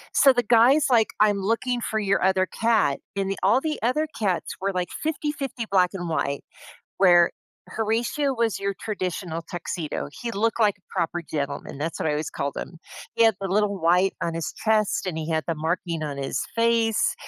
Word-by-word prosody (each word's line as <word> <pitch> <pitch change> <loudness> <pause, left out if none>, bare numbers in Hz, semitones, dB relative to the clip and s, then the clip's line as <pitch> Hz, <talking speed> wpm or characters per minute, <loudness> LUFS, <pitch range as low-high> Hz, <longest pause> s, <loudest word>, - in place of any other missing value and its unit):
So, 275 - +7
the 245 -1 +1
guy's 245 +7 +5
like, 230 -3 +4
"I'm 205 -2 +4
looking 235 +4 0
for 220 0 -1
your 200 -2 +1
other 190 0 +3
cat," 225 -13 +1 0.2
and 195 0 0
the 195 - -2
all 225 +7 +4
the 310 +1 -2
other 300 +7 +1
cats 195 -5 -1
were, 195 +1 0
like, 180 -1 -2 0.2
50/50 290 -6 -3
black 185 -2 +4
and 175 -3 -4
white, 140 -3 -1 0.6
where 175 -3 +6 0.4
Horatio 235 +6 -1
was 230 -2 0
your 200 0 -1
traditional 180 -5 -3
tuxedo. 170 -4 -4
He 240 - -3
looked 230 +2 0
like 205 -2 +3
a - - -37
proper 175 -1 -1
gentleman. 140 -3 -4
That's 160 +3 -3
what - - -2
I - - +2
always 150 0 -2
called 140 0 -3
him. 165 - -7 0.4
He 230 - +4
had 225 -2 +5
the 195 - -3
little 200 0 +1
white 180 +3 +3
on 165 -1 -1
his 165 - -3
chest, 215 -3 +1
and 175 - -3
he 160 0 -4
had 160 -1 0
the 165 - +1
marking 165 +1 -2
on 145 -2 -4
his 135 - -2
face 230 -1 +2
195 Hz, 195 wpm, -24 LUFS, 170-230 Hz, 0.6 s, So